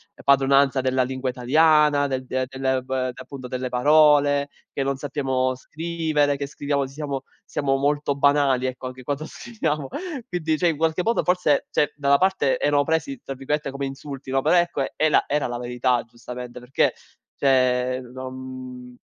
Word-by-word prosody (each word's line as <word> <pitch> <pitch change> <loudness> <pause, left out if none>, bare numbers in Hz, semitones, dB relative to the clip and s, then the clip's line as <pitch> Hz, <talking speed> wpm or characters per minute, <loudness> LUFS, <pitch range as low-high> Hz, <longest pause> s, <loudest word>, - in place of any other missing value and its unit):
ehm, - - -15
padronanza 135 0 +4
della 130 0 +1
lingua 130 +1 -3
italiana, 150 +3 +4
del 130 -1 -3
de 130 0 -1
delle 130 0 -1
v 130 - -13 0.2
appunto, 130 0 -9
delle 130 0 -3
parole, 145 +2 +4 0.2
che 135 - -2
non 135 0 -1
sappiamo 130 -2 -1
scrivere, 155 0 -1
che 140 - -3
scriviamo 140 0 -1
siamo 140 0 -5 0.2
siamo 135 -2 -1
molto 145 +1 0
banali, 140 -2 +3
ecco, 130 0 -6
anche 130 0 -9
quando 145 +3 -3
scriviamo. 155 - -3 0.4
Quindi, 160 -3 0
cioè, 175 - +3
in 160 - -2
qualche 160 +2 +1
modo, 230 +1 +1
forse 180 -5 +2
cioè, 150 - +1
da 140 -1 -1
una 140 - +7
parte, 185 -8 +2
erano 145 0 +3
presi 160 - -1
tra 135 - -5
virgolette 135 +2 -2
"come 140 0 -3
insulti", 135 0 -8
no, 135 0 +1
però, 180 - +4
ecco, 175 -5 +1
è 155 - +2
la - - +4
era 145 -2 0
la 120 0 -4
verità, 125 0 0
giustamente, 120 +1 -9
perché, 125 +2 +1 0.4
cioè, 130 -2 +2
non, 130 0 -6
mhmm, 130 -1 -9
140 Hz, 175 wpm, -23 LUFS, 130-150 Hz, 0.4 s, una